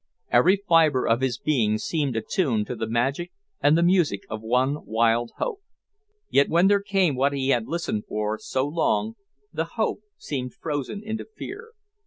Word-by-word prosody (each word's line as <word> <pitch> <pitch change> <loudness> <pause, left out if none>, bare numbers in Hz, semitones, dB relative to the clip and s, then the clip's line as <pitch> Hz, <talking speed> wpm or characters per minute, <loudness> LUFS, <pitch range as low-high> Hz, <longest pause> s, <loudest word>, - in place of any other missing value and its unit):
Every 185 +3 +5
fibre 160 -6 +4
of 115 +2 +2
his 130 -2 0
being 115 -8 +1
seemed 145 0 -2
attuned 115 - 0
to 125 - -5
the 110 - -3
magic 135 +9 -1 0.3
and 150 +2 +5
the 170 - +3
music 170 - +2
of 110 0 -4
one 130 +6 0
wild 115 +1 +2
hope. 430 -5 -3 0.7
Yet 140 - +3
when 170 +3 +4
there 200 0 +4
came 190 -7 +1
what 140 +2 +1
he 135 -1 -1
had 120 -4 +2
listened 165 -11 -2
for 105 0 -2
so 130 +1 -1
long, 110 -9 0 0.4
the 160 - -1
hope 220 - 0 0.2
seemed 125 -4 -5
frozen 150 +7 -4
into 220 0 -4
fear. 460 -1 -8
140 Hz, 170 wpm, -25 LUFS, 115-170 Hz, 0.7 s, Every